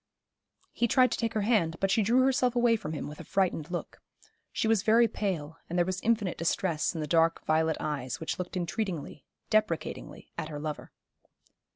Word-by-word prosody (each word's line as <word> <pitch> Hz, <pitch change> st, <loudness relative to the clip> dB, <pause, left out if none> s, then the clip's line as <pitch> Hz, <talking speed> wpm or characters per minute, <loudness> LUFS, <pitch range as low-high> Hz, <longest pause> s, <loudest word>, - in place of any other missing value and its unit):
He 235 Hz, -, +1 dB
tried 255 Hz, +1 st, +4 dB
to -, -, -1 dB
take 225 Hz, -1 st, -1 dB
her 215 Hz, -, +1 dB
hand, 200 Hz, -8 st, +2 dB
but 195 Hz, 0 st, +1 dB
she 220 Hz, -, +3 dB
drew 235 Hz, +5 st, +4 dB
herself 255 Hz, -2 st, +2 dB
away 240 Hz, -1 st, +4 dB
from 155 Hz, -8 st, -5 dB
him 150 Hz, -, -4 dB
with 150 Hz, -, -9 dB
a -, -, -7 dB
frightened 180 Hz, -6 st, 0 dB
look. 175 Hz, -1 st, -5 dB, 0.5 s
She -, -, -1 dB
was 220 Hz, -3 st, +3 dB
very 230 Hz, +3 st, +5 dB
pale, 165 Hz, -8 st, -3 dB
and 175 Hz, -, -2 dB
there 175 Hz, -, +3 dB
was 185 Hz, +1 st, -3 dB
infinite 215 Hz, -5 st, 0 dB
distress 170 Hz, -1 st, 0 dB
in 160 Hz, -, -2 dB
the -, -, -2 dB
dark 165 Hz, +2 st, +2 dB
violet 160 Hz, 0 st, +2 dB
eyes, 140 Hz, -4 st, -3 dB
which 160 Hz, +4 st, -4 dB
looked 180 Hz, +1 st, -4 dB
entreatingly, 175 Hz, -, -4 dB, 0.3 s
deprecatingly 215 Hz, -7 st, -1 dB
at 155 Hz, -, -4 dB
her 150 Hz, -, -5 dB
lover. 150 Hz, 0 st, -5 dB
185 Hz, 195 wpm, -29 LUFS, 160-225 Hz, 0.5 s, very